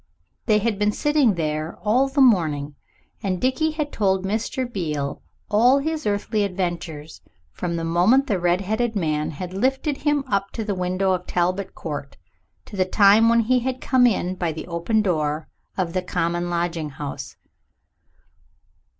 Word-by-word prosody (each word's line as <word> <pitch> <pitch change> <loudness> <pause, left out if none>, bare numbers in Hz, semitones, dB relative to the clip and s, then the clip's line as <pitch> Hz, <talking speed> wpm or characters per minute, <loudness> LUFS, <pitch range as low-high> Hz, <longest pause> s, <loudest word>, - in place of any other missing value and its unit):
They 215 -2 +5
had 210 -1 -1
been 210 0 +2
sitting 290 -4 +2
there 155 -1 -3
all 245 +6 +3
the 275 +1 +1
morning, 155 - +3 0.5
and 185 -2 -1
Dickie 265 - +1
had 305 -2 -3
told 190 -2 +1
Mr. 225 +5 -2
Beale 155 - -3 0.3
all 235 +6 +4
his 310 0 -2
earthly 205 +1 0
adventures 175 -5 -4 0.3
from 175 -2 -3
the 165 - -3
moment 180 +12 +3
the 205 -9 0
redheaded 195 +7 0
man 155 -4 0
had 175 +4 -6
lifted 265 - 0
him 295 -2 +1
up 200 -3 0
to 225 - -3
the 210 -1 -2
window 185 +1 0
of 180 -1 -2
Talbot 180 +2 -1
Court 145 -3 -6 0.5
to - - -10
the 190 - +3
time 205 +4 +5
when 235 0 +4
he 250 +3 +2
had 255 +1 -3
come 255 -2 +4
in 185 -5 0
by 175 -3 -2
the 160 0 -7
open 180 +6 0
door 155 -4 -1 0.3
of 175 -3 -1
the 185 - 0
common 175 -1 -1
lodging 170 -2 -2
house. 140 0 -7
195 Hz, 160 wpm, -23 LUFS, 170-230 Hz, 0.5 s, They